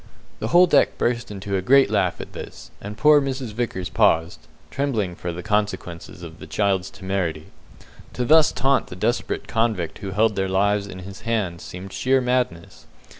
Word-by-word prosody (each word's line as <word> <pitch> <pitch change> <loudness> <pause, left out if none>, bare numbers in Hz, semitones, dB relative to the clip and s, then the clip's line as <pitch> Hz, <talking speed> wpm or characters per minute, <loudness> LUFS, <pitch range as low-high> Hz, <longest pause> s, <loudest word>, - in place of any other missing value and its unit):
The 110 - -2
whole 175 +9 +6
deck 150 -5 +3
burst 120 0 -1
into 100 -1 -4
a 95 - 0
great 135 +3 +4
laugh 100 -4 +1
at - - -9
this, - - -9
and 105 +1 -7
poor 150 +5 +6
Mrs. 135 -4 -3
Vickers 105 -6 -3
paused, 85 -5 +1 0.2
trembling 115 -10 -1
for 85 0 -5
the 85 +1 -7
consequences 105 -5 -3
of 85 0 -10
the - - -10
child's 95 -3 0
temerity. 95 -6 -4 0.6
To 125 - -2
thus 155 +2 +6
taunt 135 0 +1
the - - -9
desperate 115 +6 -2
convict 110 -8 -1
who 100 -2 -5
held 105 +2 +2
their 95 -1 -1
lives 100 +1 +1
in 95 - -9
his 100 0 -10
hands 105 -7 -2
seemed 95 +2 -9
sheer 130 +1 +2
madness. 125 -9 -2
105 Hz, 175 wpm, -23 LUFS, 90-120 Hz, 0.6 s, whole